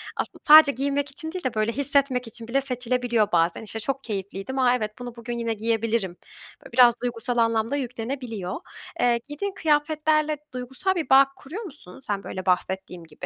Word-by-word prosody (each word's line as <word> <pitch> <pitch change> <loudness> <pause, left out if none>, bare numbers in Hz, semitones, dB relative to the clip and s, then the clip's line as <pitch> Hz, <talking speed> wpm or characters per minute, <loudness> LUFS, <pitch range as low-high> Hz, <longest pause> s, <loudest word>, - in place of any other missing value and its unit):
Aslında - - -5
sadece 305 -1 +10
giyinmek 280 +2 -1
için 320 +3 -2
değil 370 0 -6
de 255 -2 -1
böyle 215 +1 0
hissetmek 275 -2 +1
için 230 0 -7
bile 270 +3 +1
seçilebiliyor 245 -4 0
bazen. 170 +2 +2
İşte 220 +1 -4
çok 275 +4 -3
keyifliydim, 200 +4 -4
a 250 -1 +4
evet 215 -3 -2
bunu 245 -1 -7
bugün 235 0 -5
yine 230 -1 -1
giyebilirim. 220 -4 -1 0.5
Böyle - - -13
biraz 240 -1 +7
duygusal 240 0 -3
anlam 230 +1 +2
da - - +1
yüklenebiliyor. 240 -6 -4 0.4
Eee, 240 -1 +3
giydiğin 380 +7 -4
kıyafetlerle 305 -1 +1 0.2
duygusal 265 +10 -2
bir 320 -6 -3
bağ 270 +1 +7
kuruyor 325 - -7
musun 270 - -12
sen? 200 -1 -2
Böyle 185 0 -6
bahsettiğim 185 -1 -1
gibi 165 - -10
245 Hz, 175 wpm, -25 LUFS, 225-280 Hz, 0.5 s, sadece